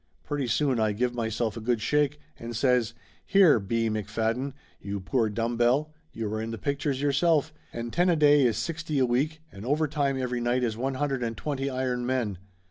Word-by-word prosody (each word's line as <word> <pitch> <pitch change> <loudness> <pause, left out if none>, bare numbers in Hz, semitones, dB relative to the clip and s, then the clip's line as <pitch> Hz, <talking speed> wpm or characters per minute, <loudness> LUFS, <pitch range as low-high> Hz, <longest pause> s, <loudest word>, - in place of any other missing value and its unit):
Pretty 145 -3 -2
soon 130 0 +1
I 110 -1 +2
give 120 +3 0
myself 115 -1 -2
a 115 - -6
good 120 +1 +1
shake 145 - +1 0.2
and 115 0 -6
says 120 -2 +2 0.3
"Here, 185 - +5
B. 115 +3 0
McFadden, 110 +5 -1 0.3
you 100 0 -4
poor 110 +4 0
dumb 115 +2 -2
bell, 130 +6 +2 0.2
you 115 - -4
are 110 - -2
in 110 - -4
the 115 - -4
pictures 140 +1 -2
yourself, 150 +2 +2 0.2
and 115 0 -5
ten 175 +1 +3
a 170 - +4
day 145 -2 +5
is 115 - -1
sixty 165 -2 -3
a 130 - +4
week 145 +6 0
and 100 - -10
overtime 145 0 0
every 125 -1 -2
night 120 +1 +1
is 115 -3 0
one 130 +3 -2
hundred 135 -1 -1
and 115 -2 -3
twenty 140 0 -2
iron 130 -2 -1
men. 120 -7 -1
125 Hz, 200 wpm, -27 LUFS, 115-145 Hz, 0.3 s, Here